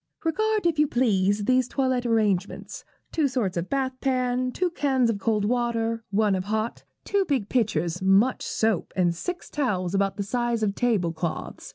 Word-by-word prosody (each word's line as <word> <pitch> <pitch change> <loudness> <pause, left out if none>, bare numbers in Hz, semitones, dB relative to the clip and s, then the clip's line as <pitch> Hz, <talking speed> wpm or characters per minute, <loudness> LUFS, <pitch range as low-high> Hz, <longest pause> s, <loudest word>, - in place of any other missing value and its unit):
'Regard, 430 +5 0
if 330 -3 +1
you 300 - +4
please, 205 -5 +1
these 255 +1 +3
toilette 255 -2 0
arrangements 210 -5 -1 0.3
two 310 -3 +2
sorts 240 -8 -1
of 170 +1 -3
bath 270 -1 0
pan, 255 -1 0
two 360 +6 -1
cans 265 -7 +2
of 205 - -4
cold 210 0 +1
water, 230 -1 0
one 205 0 +2
of 185 -1 -1
hot, 220 +2 -2 0.2
two 400 -1 +2
big 265 - -1
pitchers, 195 -7 0
much 195 +7 +3
soap, 220 -4 0
and 175 -2 +2
six 360 - -5
towels 190 - -1
about 195 0 +1
the 200 - -1
size 240 +1 -1
of 200 -2 +1
table 200 -8 +1
cloths. 165 0 -5
230 Hz, 175 wpm, -25 LUFS, 200-260 Hz, 0.3 s, you